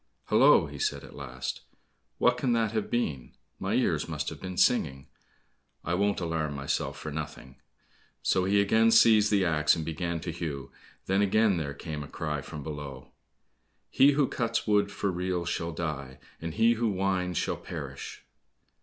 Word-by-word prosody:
"Hollo," - - +6
he - - -9
said - - -1
at - - -12
last, 65 -3 -5 0.6
"what 125 - +4
can 125 0 0
that 115 -2 +1
have 110 -2 -2
been; 75 - -2 0.3
my - - -1
ears - - +1
must - - -2
have - - -10
been 95 -1 -6
singing, 70 - +2 0.8
I 85 - -1
won't 100 +3 +1
alarm 80 -4 -2
myself 70 -1 -2
for 75 - -6
nothing." 75 -4 -7 0.7
So 90 -1 +2
he 100 +2 +3
again 110 +3 +4
seized 110 -2 +6
the 100 -3 +3
axe, 75 -3 +3
and 80 -2 -4
began 85 +1 -3
to 85 - -4
hew, 80 -5 -5 0.3
then 95 +1 +2
again 105 -1 +3
there 70 -3 -3
came 75 0 -6
a 70 - -7
cry 75 -2 -3
from 75 +1 -8
below: 70 -3 -7 0.8
"He 140 +2 +6
who 140 -1 +2
cuts 115 -2 -1
wood 105 -1 +2
for 100 -1 -1
reels 90 -1 -2
shall 85 0 -2
die, 70 -6 -4 0.2
And 80 0 -5
he 115 +2 +4
who 115 0 0
winds, 95 -3 0
shall - - -1
perish." - - -7
85 Hz, 170 wpm, -28 LUFS, 75-105 Hz, 0.8 s, Hollo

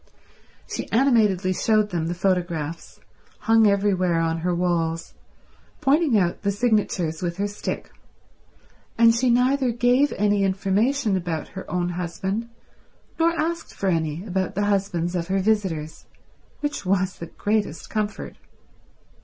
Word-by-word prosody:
She - - -5
animatedly 215 -7 +3
showed 215 +1 +2
them 165 -2 -1
the 175 - -2
photographs, 175 -4 -2 0.4
hung 225 -1 +5
everywhere 190 -4 +2
on 165 0 0
her 175 +1 0
walls, 165 -2 -1 0.7
pointing 290 -3 +3
out 175 -3 0
the 200 - 0
signatures 200 -7 0
with 170 -1 -3
her 200 - 0
stick, 205 0 -5 1.1
and 230 0 +6
she 245 +2 +1
neither 255 +2 +3
gave 245 +4 +3
any 205 0 +1
information 200 +5 +1
about 170 -4 -3
her 190 - -9
own 180 -1 -1
husband 190 +6 -3 0.7
nor 335 +1 +2
asked 330 +1 -2
for 195 - -1
any 165 +1 -1
about 190 -2 -2
the 205 +1 +1
husbands 190 -4 0
of 170 -1 -2
her 190 +1 0
visitors; 185 -7 -1 0.5
which 290 -6 -3
was 185 0 0
the 170 - -6
greatest 205 -2 -2
comfort. 210 -1 -3
195 Hz, 135 wpm, -24 LUFS, 175-225 Hz, 1.1 s, and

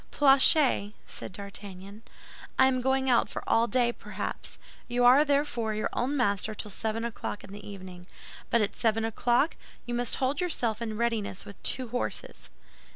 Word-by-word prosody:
"Planchet," 270 -6 +5
said - - -7
D'Artagnan, 200 +1 -9 0.6
"I 265 - +6
am 255 -1 +2
going 265 +1 +1
out 245 -2 +3
for - - -5
all 230 +1 +3
day, 245 -1 +2
perhaps. - - -6 0.3
You 245 0 +1
are, 260 +4 +7
therefore, 280 -7 0
your 215 - -2
own 275 +4 -1
master 215 -3 0
till 210 - -6
seven 220 +3 -2
o'clock 220 -2 -5
in 195 - -12
the 205 0 -9
evening; 185 -2 -10 0.4
but 235 - +3
at 205 - -3
seven 225 -1 +1
o'clock 240 +6 +1 0.3
you 240 - -4
must 240 0 +1
hold 270 +4 -1
yourself 240 - -1
in 220 -2 -3
readiness 225 -5 -1
with 200 - -12
two 255 -2 0
horses." 245 +2 -4
235 Hz, 165 wpm, -28 LUFS, 205-255 Hz, 0.6 s, are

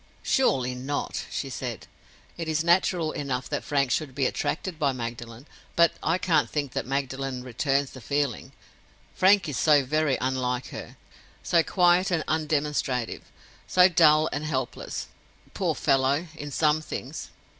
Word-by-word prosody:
"Surely 130 - +2
not?" 135 +3 -3
she 140 - -3
said. 125 -4 -5 0.5
"It 165 -1 -5
is 160 0 0
natural 170 -2 +2
enough 130 -3 -3
that - - -2
Frank 140 -3 0
should 135 -1 -1
be 135 -1 +1
attracted 165 +5 -2
by 140 -3 +2
Magdalen; 120 0 -7 0.3
but 170 0 +5
I 165 +3 +1
can't 175 -3 +2
think 145 -3 -2
that - - -3
Magdalen 135 -1 -3
returns 135 +2 0
the 130 - -11
feeling. 140 -1 -2 0.6
Frank 190 -1 +4
is 145 - -3
so 145 -3 +4
very 155 0 +1
unlike 130 -1 -1
her; - - -9 0.5
so 170 - +3
quiet 180 +2 +3
and 170 -4 0
undemonstrative; 150 -5 -1 0.5
so 180 0 +6
dull 155 -3 +5
and 145 - -3
helpless, 130 -5 -3 0.5
poor - - 0
fellow, 135 +4 +2
in 145 -2 -7
some 150 +1 +2
things. - - -6
145 Hz, 145 wpm, -26 LUFS, 130-160 Hz, 0.6 s, so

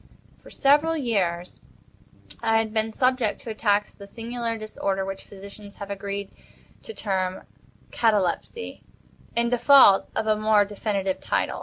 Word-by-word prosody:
For - - -16
several 300 +4 +3
years 185 - -2 0.8
I 225 0 +2
had 220 -1 -1
been 220 0 0
subject 255 -2 +1
to 230 - -6
attacks 210 -1 +1
of - - -30
the 200 - -10
singular 230 +1 -4
disorder 195 -3 -3
which 195 0 -6
physicians 200 +1 -12
have 200 -1 -8
agreed 200 0 -5 0.5
to - - -8
term 190 -3 -2 0.5
catalepsy, 215 - -1 0.5
in 235 0 +1
default 245 -4 +6
of 220 - -1
a 215 -1 +3
more 215 -1 +3
definitive 200 -2 -2
title. - - -1
215 Hz, 140 wpm, -25 LUFS, 200-230 Hz, 0.8 s, default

